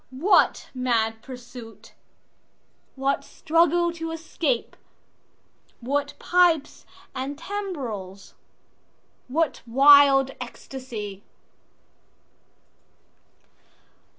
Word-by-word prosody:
What 280 +11 +2
mad 225 -3 0
pursuit? 245 -3 -11 1.0
What 275 +1 -1
struggle 340 +1 +1
to 330 -1 -5
escape? 315 -5 -2 1.0
What 285 +4 -2
pipes 345 -5 +1 0.3
and 270 +2 -4
timbrels? 260 - -6 0.9
What 295 +1 -1
wild 275 +1 +6
ecstasy? 235 -5 -8
270 Hz, 60 wpm, -24 LUFS, 240-325 Hz, 1.0 s, wild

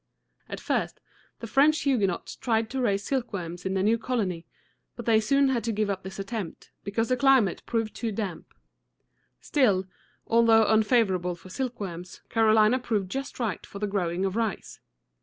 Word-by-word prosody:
At - - -5
first, - - -2 0.4
the - - -4
French 285 +6 +3
Huguenots 210 -11 0
tried 225 -2 -1
to 265 0 -2
raise 200 -4 +1
silkworms 190 -10 -3
in 190 - -2
their 190 - +1
new 225 +3 +3
colony; 195 -9 -2 0.5
but 235 - -8
they 225 -2 +4
soon 275 +5 +3
had 245 -3 0
to 230 - 0
give 210 -1 0
up 190 -1 -4
this 190 0 -8
attempt, 195 -3 -6
because 220 +3 -1
the 255 - +3
climate 260 -7 +3
proved 225 -2 -1
too 230 -2 -3
damp. 195 -5 -5 0.9
Still, 205 -10 +2 0.4
although 225 -1 +5
unfavorable 210 -5 +2
for 175 +2 -15
silkworms, 195 -8 -5
Carolina 220 +1 +4
proved 205 -6 -2
just 270 0 -5
right 220 -7 -2
for - - -10
the 210 - -2
growing 185 -2 -1
of 190 0 -2
rice. 225 -3 -3
220 Hz, 165 wpm, -27 LUFS, 190-235 Hz, 0.9 s, although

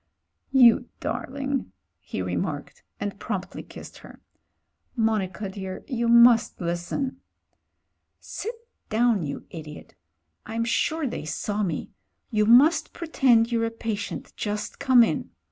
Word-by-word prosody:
"You 245 -2 +6
darling," 270 - -3 0.3
he 95 - -5
remarked 90 -1 -4 0.2
and 200 -1 -4
promptly 200 -4 -4
kissed - - -12
her. - - -14 0.8
"Monica, 215 -4 0
dear, 190 -1 -7
you 235 -4 -1
must 235 0 +6
listen 175 +10 -3 0.5
" - - -52
"Sit 455 +3 -6 0.3
down, 230 -2 +2
you 145 -3 -5
idiot. 155 -3 -9 0.5
I'm 230 +1 -2
sure 310 +6 0
they 235 - -4
saw 205 +7 -2
me. 170 -7 -3 0.4
You 210 -2 +2
must 290 +8 +5
pretend 250 -8 +3
you're 230 -1 +1
a - - 0
patient 225 -3 -5
just 210 0 -4
come 260 -4 +6
in. 155 - -1
225 Hz, 125 wpm, -25 LUFS, 195-245 Hz, 0.8 s, You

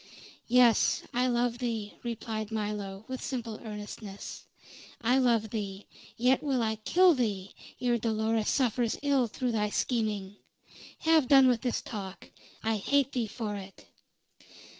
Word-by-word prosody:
"Yes, 245 -2 +4
I 250 +1 +2
love 240 -1 0
thee," 225 -4 -3
replied 220 -2 -4
Milo, 210 -2 -4
with 260 -1 -5
simple 235 -5 -4
earnestness. 210 -2 -8 0.5
"I 245 +3 +3
love 230 -4 +2
thee; 200 -3 -4 0.3
yet 250 +2 +3
will 270 -5 0
I 220 0 -1
kill 355 +11 +5
thee 205 -7 -2 0.3
ere 240 -1 +1
Dolores 220 0 0
suffers 245 -3 +1
ill 275 -4 +3
through 245 +3 -2
thy 210 -2 0
scheming. 210 -4 -1 0.6
Have 320 -4 +4
done 270 -1 +7
with 245 -3 +2
this 250 -2 -1
talk. 195 -4 -7 0.3
I 220 0 +1
hate 275 +6 +2
thee 240 -3 -1
for 215 -1 -4
it!" 195 -1 -10
230 Hz, 140 wpm, -29 LUFS, 210-250 Hz, 0.6 s, done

